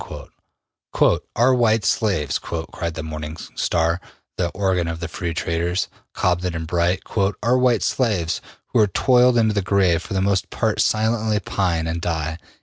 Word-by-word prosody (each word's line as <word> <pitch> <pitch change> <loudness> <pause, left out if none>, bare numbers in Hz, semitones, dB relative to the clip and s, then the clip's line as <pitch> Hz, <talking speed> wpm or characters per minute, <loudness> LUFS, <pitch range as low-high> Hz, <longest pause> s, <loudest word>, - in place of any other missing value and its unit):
'' - - -61
``Our 125 +3 +3
white 115 -4 +2
slaves,'' 95 - +1
cried 85 0 -5
the 80 - -4
``Morning 80 0 -6 0.2
Star,'' 85 +1 +1 0.3
the 90 - 0
organ 95 -2 0
of 85 0 -4
the 85 - -4
free 85 +1 -4
traders, 85 +2 -1 0.3
Cobden 90 -1 0
and 80 0 -3
Bright, 85 +2 0
``our 105 +5 0
white 125 -3 +3
slaves, 100 -10 0 0.3
who - - +1
are 105 - +5
toiled 125 +3 +4
into 110 -2 +3
the 100 - +1
grave, 95 -3 +2
for 100 - -6
the - - +2
most 95 0 +1
part - - 0
silently 110 -1 +1
pine 90 -4 -1
and 80 +1 -3
die.'' 80 -1 -2
90 Hz, 160 wpm, -22 LUFS, 85-110 Hz, 0.3 s, are